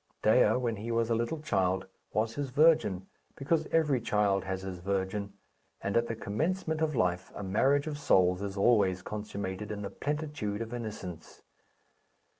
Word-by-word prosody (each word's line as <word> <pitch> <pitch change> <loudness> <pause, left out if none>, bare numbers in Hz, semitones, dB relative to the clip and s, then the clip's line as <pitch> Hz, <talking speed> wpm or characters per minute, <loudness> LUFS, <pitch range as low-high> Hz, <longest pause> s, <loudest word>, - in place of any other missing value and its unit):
Dea, - - +5
when 120 -3 -1
he 110 +3 -6
was 115 0 +1
a - - +4
little 120 +7 -1
child, 95 -8 +1 0.3
was 110 +2 0
his 145 0 -3
virgin; 145 - +3 0.3
because 155 +3 0
every 150 -6 +2
child 100 -3 +1
has 95 0 -3
his 95 -2 -5
virgin, 100 +2 -2 0.5
and 100 - -3
at 115 0 +3
the 115 - -3
commencement 160 - -1
of 155 -2 +1
life 90 -4 0
a 105 - -5
marriage 135 +9 +2
of 150 -2 -4
souls 90 -8 +3
is 100 0 -4
always 100 -4 +3
consummated 105 -1 -5
in 105 -1 -4
the 100 - -5
plenitude 145 -8 -3
of 115 +1 -8
innocence. 105 -8 -7
105 Hz, 165 wpm, -30 LUFS, 95-140 Hz, 0.5 s, Dea